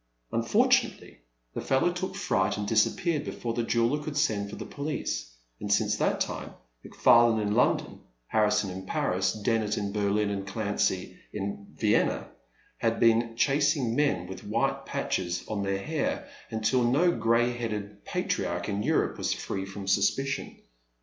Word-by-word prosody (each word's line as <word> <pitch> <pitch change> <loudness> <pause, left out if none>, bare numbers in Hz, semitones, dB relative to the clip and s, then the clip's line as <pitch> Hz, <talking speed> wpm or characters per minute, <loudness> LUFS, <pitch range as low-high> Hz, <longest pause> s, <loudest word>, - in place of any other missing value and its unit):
Unfortunately - - +1 0.3
the - - -3
fellow 135 +6 +2
took 185 +1 -4
fright 95 - 0
and 105 0 -3
disappeared 150 - +2
before 120 -5 -4
the 120 - 0
jeweller 115 +5 +1
could 150 -1 -5
send 105 -8 +1
for 105 - -7
the - - -7
police, 140 - -4 0.3
and 100 - -4
since 105 0 +3
that - - +1
time, - - -3 0.3
McFarlane 115 -1 +4
in 105 -1 -1
I/>ndon, - - +1 0.3
Harrison 105 - +2
in 95 +1 -7
Paris, 95 0 0
Dennet 110 0 0
in 100 -1 -2
Berlin, 105 0 +1
and 100 -1 -4
Clancy 100 -3 -1
in 100 0 -5
Vienna, - - +1 0.5
had - - 0
been 115 0 +3
chas 145 +4 +3
ing 120 -4 -1
men 140 -11 +1
with 95 +1 -8
white - - -1
patches 90 -1 -2
on 105 -2 -2
their 100 0 0
hair 155 +9 -2 0.2
until 110 +3 +1
no 145 +9 +4
gray 115 +1 +2
headed 105 -4 -5
patriarch 85 0 -2
in 100 0 -1
Europe - - +1
was - - 0
free 95 +10 -4
from 95 0 -7
suspicion. 120 +8 0
110 Hz, 155 wpm, -28 LUFS, 100-125 Hz, 0.5 s, McFarlane